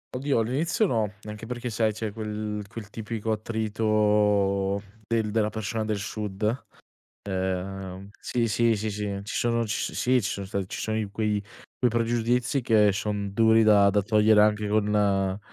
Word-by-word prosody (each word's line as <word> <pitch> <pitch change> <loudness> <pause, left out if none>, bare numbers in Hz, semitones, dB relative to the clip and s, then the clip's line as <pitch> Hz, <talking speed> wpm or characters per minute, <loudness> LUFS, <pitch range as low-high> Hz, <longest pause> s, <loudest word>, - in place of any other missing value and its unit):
Oddio, 135 -2 +1
all'inizio 150 - +1
no, 110 - 0
anche 105 +1 -8
perché 125 0 -4
sai 110 0 +1
c'è 110 0 -4
quel 105 -1 -4
quel 105 -1 -9
tipico 110 0 -4
attrito 105 -3 +1 0.3
del 110 -2 0
della 105 -1 +1
persona 110 +1 -3
del 105 -1 -1
sud. 105 +3 -3 0.6
Ehm 95 0 -3
sì, 120 -2 -1
sì, 115 +2 +3
sì, 110 +1 -2
sì, 100 -1 -3
ci 100 - -6
sono 115 -1 +1
ci 105 - -2
so - - -3
sì, 125 -1 +2
ci 95 - -1
sono 100 -1 -4
stati 100 -1 -3
ci - - -5
sono 110 0 -1
i 110 -2 -2
quei 105 0 -1 0.3
quei 125 - +2
pregiudizi 120 +3 +1
che 110 -3 +4
son 100 0 -2
duri 110 +1 +5
da 100 -2 +6
da 105 +1 +2
togliere 105 +1 +4
anche 105 0 +3
con 100 -2 +1
105 Hz, 165 wpm, -26 LUFS, 100-115 Hz, 0.6 s, da